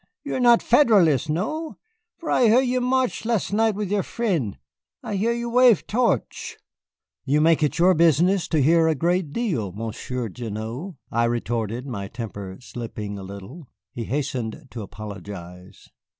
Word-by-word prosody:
You 285 Hz, -, -4 dB
are -, -, -1 dB
not 240 Hz, -2 st, +5 dB
Federalist, 195 Hz, -, +4 dB
no, 305 Hz, -, -2 dB, 0.4 s
for 330 Hz, -, -5 dB
I 250 Hz, -, +4 dB
hear 235 Hz, +4 st, +6 dB
you 255 Hz, -1 st, 0 dB
march 255 Hz, 0 st, 0 dB
las' 225 Hz, -3 st, -1 dB
night 220 Hz, 0 st, +2 dB
with 205 Hz, -2 st, -3 dB
your 205 Hz, -1 st, +2 dB
frien', 170 Hz, -, -2 dB, 0.5 s
I 205 Hz, -, -3 dB
hear 215 Hz, +4 st, +1 dB
you 235 Hz, 0 st, -2 dB
wave 245 Hz, -2 st, +5 dB
torch." 240 Hz, +2 st, -1 dB, 0.7 s
"You 145 Hz, +2 st, +2 dB
make 160 Hz, +1 st, +4 dB
it 150 Hz, -, +1 dB
your 180 Hz, +2 st, +5 dB
business 170 Hz, +3 st, +3 dB
to 155 Hz, -4 st, +2 dB
hear 165 Hz, +3 st, +4 dB
a 160 Hz, -, +2 dB
great 170 Hz, +1 st, 0 dB
deal, 155 Hz, -, -1 dB
Monsieur 115 Hz, +3 st, -4 dB
Gignoux," 115 Hz, -, -6 dB
I 115 Hz, 0 st, +2 dB
retorted, 115 Hz, 0 st, -2 dB
my 100 Hz, -7 st, -5 dB
temper 100 Hz, -4 st, -7 dB
slipping 110 Hz, -5 st, -6 dB
a -, -, -8 dB
little. 100 Hz, -, -10 dB, 0.3 s
He 115 Hz, -, -5 dB
hastened 130 Hz, -2 st, -3 dB
to 115 Hz, -, -6 dB
apologize. 95 Hz, -3 st, -9 dB
150 Hz, 160 wpm, -24 LUFS, -, 0.7 s, hear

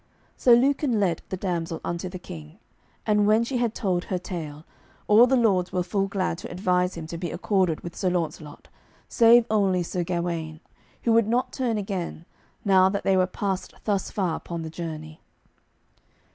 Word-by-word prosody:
So 245 Hz, -2 st, +6 dB
Lucan 265 Hz, -1 st, +2 dB
led 180 Hz, -5 st, +1 dB
the 190 Hz, -, -3 dB
damsel 170 Hz, -3 st, -3 dB
unto 170 Hz, +1 st, -3 dB
the 185 Hz, -, -7 dB
King, 165 Hz, -2 st, -10 dB, 0.5 s
and 210 Hz, -1 st, +3 dB
when 215 Hz, +2 st, +4 dB
she 250 Hz, +2 st, -2 dB
had 235 Hz, -2 st, 0 dB
told 180 Hz, -3 st, -1 dB
her 185 Hz, -, -2 dB
tale, 165 Hz, -4 st, -7 dB, 0.4 s
all 220 Hz, +4 st, +7 dB
the 265 Hz, -, +3 dB
lords 195 Hz, -7 st, +2 dB
were 180 Hz, -, 0 dB
full 195 Hz, +2 st, -1 dB
glad 190 Hz, -3 st, -2 dB
to -, -, -8 dB
advise 180 Hz, 0 st, 0 dB
him 165 Hz, -, -6 dB
to 165 Hz, +1 st, -6 dB
be 175 Hz, -1 st, -3 dB
accorded 180 Hz, -1 st, 0 dB
with 170 Hz, -1 st, -8 dB
Sir 185 Hz, -, 0 dB
Launcelot, 160 Hz, -4 st, -4 dB, 0.4 s
save 235 Hz, 0 st, +6 dB
only 195 Hz, -4 st, +2 dB
Sir 175 Hz, +1 st, -2 dB
Gawaine, 170 Hz, -2 st, -3 dB, 0.4 s
who 235 Hz, -, +2 dB
would 230 Hz, -2 st, +4 dB
not 240 Hz, +3 st, 0 dB
turn 240 Hz, -4 st, -1 dB
again, 190 Hz, -5 st, -4 dB, 0.4 s
now 190 Hz, -1 st, +5 dB
that 200 Hz, +1 st, -2 dB
they 195 Hz, -, +3 dB
were 185 Hz, -1 st, +3 dB
past 190 Hz, 0 st, -3 dB
thus 200 Hz, -3 st, -1 dB
far 185 Hz, -5 st, -1 dB
upon 170 Hz, -1 st, -6 dB
the 160 Hz, -, -6 dB
journey. 155 Hz, -2 st, -7 dB
185 Hz, 180 wpm, -25 LUFS, 170-210 Hz, 0.5 s, all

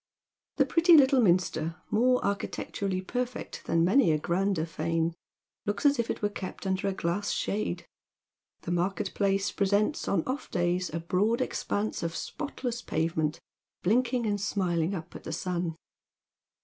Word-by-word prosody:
The -, -, +4 dB
pretty 335 Hz, 0 st, +6 dB
little 270 Hz, -2 st, +6 dB
minster, 170 Hz, -4 st, +2 dB, 0.2 s
more 250 Hz, +4 st, +3 dB
architecturally 200 Hz, -1 st, -2 dB
perfect 245 Hz, +5 st, -4 dB
than 165 Hz, 0 st, +3 dB
many 205 Hz, -1 st, +5 dB
a 155 Hz, -, +3 dB
grander 175 Hz, +2 st, 0 dB
fane, 165 Hz, 0 st, -1 dB, 0.5 s
looks 205 Hz, +6 st, -2 dB
as 285 Hz, -3 st, +5 dB
if 235 Hz, -, 0 dB
it -, -, -3 dB
were 205 Hz, -, +3 dB
kept 195 Hz, -1 st, -7 dB
under 190 Hz, 0 st, 0 dB
a -, -, +2 dB
glass 185 Hz, +2 st, -1 dB
shade. 180 Hz, -4 st, -2 dB, 0.8 s
The -, -, -4 dB
market 175 Hz, +3 st, -1 dB
place 195 Hz, -1 st, +1 dB
presents 205 Hz, +7 st, +1 dB
on 175 Hz, -5 st, +1 dB
off 265 Hz, +3 st, -3 dB
days 175 Hz, +1 st, 0 dB
a 165 Hz, -, -2 dB
broad 190 Hz, +7 st, +1 dB
expanse 205 Hz, +1 st, -2 dB
of 170 Hz, -1 st, -3 dB
spotless 250 Hz, -5 st, -4 dB
pavement 160 Hz, -3 st, -1 dB, 0.4 s
blinking 240 Hz, +4 st, +2 dB
and 205 Hz, -2 st, 0 dB
smiling 180 Hz, -3 st, 0 dB
up 165 Hz, -3 st, -8 dB
at -, -, -8 dB
the -, -, -5 dB
sun. 170 Hz, 0 st, -2 dB
195 Hz, 150 wpm, -29 LUFS, 170-225 Hz, 0.8 s, pretty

